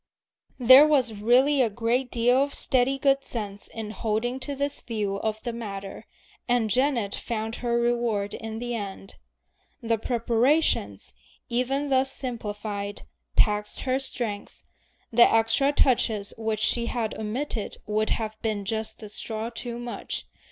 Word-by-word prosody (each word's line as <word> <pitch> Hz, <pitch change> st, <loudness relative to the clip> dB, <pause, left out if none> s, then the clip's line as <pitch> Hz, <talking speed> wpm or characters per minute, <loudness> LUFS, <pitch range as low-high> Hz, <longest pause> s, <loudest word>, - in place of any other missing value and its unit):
There 260 Hz, +4 st, +9 dB
was 260 Hz, -7 st, +2 dB
really 250 Hz, +7 st, +4 dB
a 235 Hz, -, +3 dB
great 235 Hz, +4 st, 0 dB
deal 245 Hz, +1 st, +3 dB
of 280 Hz, 0 st, -1 dB
steady 260 Hz, +1 st, +2 dB
good 275 Hz, 0 st, +2 dB
sense 205 Hz, -4 st, -6 dB
in 220 Hz, -2 st, -6 dB
holding 225 Hz, +4 st, -1 dB
to 280 Hz, +1 st, -4 dB
this 280 Hz, +1 st, -2 dB
view 210 Hz, -4 st, -2 dB
of 220 Hz, +1 st, -3 dB
the 240 Hz, -, -3 dB
matter, 200 Hz, -4 st, -7 dB, 0.4 s
and 240 Hz, -3 st, +2 dB
Janet 245 Hz, -4 st, +1 dB
found 225 Hz, -1 st, -3 dB
her 235 Hz, -1 st, 0 dB
reward 235 Hz, -4 st, 0 dB
in 220 Hz, 0 st, -6 dB
the 240 Hz, +1 st, -3 dB
end. 195 Hz, -3 st, -6 dB, 0.6 s
The 230 Hz, -3 st, 0 dB
preparations, 230 Hz, -, +1 dB, 0.4 s
even 270 Hz, +4 st, 0 dB
thus 265 Hz, 0 st, +3 dB
simplified, 210 Hz, -5 st, -5 dB, 0.3 s
taxed 210 Hz, 0 st, +2 dB
her 260 Hz, 0 st, 0 dB
strength; 230 Hz, -6 st, -4 dB, 0.5 s
the 235 Hz, +1 st, +6 dB
extra 225 Hz, +5 st, +3 dB
touches 225 Hz, -7 st, +1 dB
which 220 Hz, -1 st, -2 dB
she 235 Hz, +1 st, +1 dB
had 225 Hz, -3 st, -2 dB
omitted 220 Hz, +1 st, -3 dB
would 215 Hz, +1 st, 0 dB
have 215 Hz, -1 st, -3 dB
been 210 Hz, -3 st, -2 dB
just 220 Hz, +1 st, -3 dB
the 215 Hz, -, -9 dB
"straw 220 Hz, +2 st, -5 dB
too 235 Hz, 0 st, -5 dB
much." 240 Hz, 0 st, -5 dB
230 Hz, 145 wpm, -26 LUFS, 215-250 Hz, 0.6 s, There